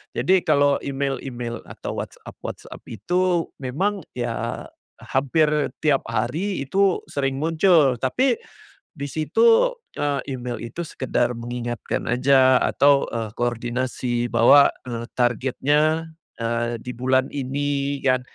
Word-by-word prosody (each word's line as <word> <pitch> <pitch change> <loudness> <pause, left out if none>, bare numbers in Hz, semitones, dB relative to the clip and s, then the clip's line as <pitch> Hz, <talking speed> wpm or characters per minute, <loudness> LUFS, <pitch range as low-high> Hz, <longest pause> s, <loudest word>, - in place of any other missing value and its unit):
Jadi 190 +1 +3
kalau 145 -2 +3
email-email 135 -4 -4
atau - - -6
WhatsApp-WhatsApp - - -8
itu, 175 - 0
memang 185 +11 -1 0.2
ya, 120 -1 -3 0.4
hampir 145 +3 +1 0.3
tiap 145 -3 +4
hari 135 - -2
itu 190 +6 +1
sering 135 -1 -1
muncul, 155 - +3
tapi, 255 - +1 0.5
di 140 -3 -6
situ, 460 - +3 0.2
eee, 145 -1 0
email 125 -3 -4
itu 120 +10 -5
sekedar 125 -5 -1
mengingatkan 120 0 -4
aja, 130 +1 +4
atau, 140 -1 +3
eee, 115 -2 -4
koordinasi 120 +1 -2
bahwa, 140 +5 +6 0.2
eee, 120 -2 -5
targetnya, 140 +6 +1 0.3
eee, 120 0 -1
di 125 - -5
bulan 130 +2 0
ini 140 0 -2
kan. 130 -1 +3
135 Hz, 110 wpm, -23 LUFS, 120-150 Hz, 0.5 s, bahwa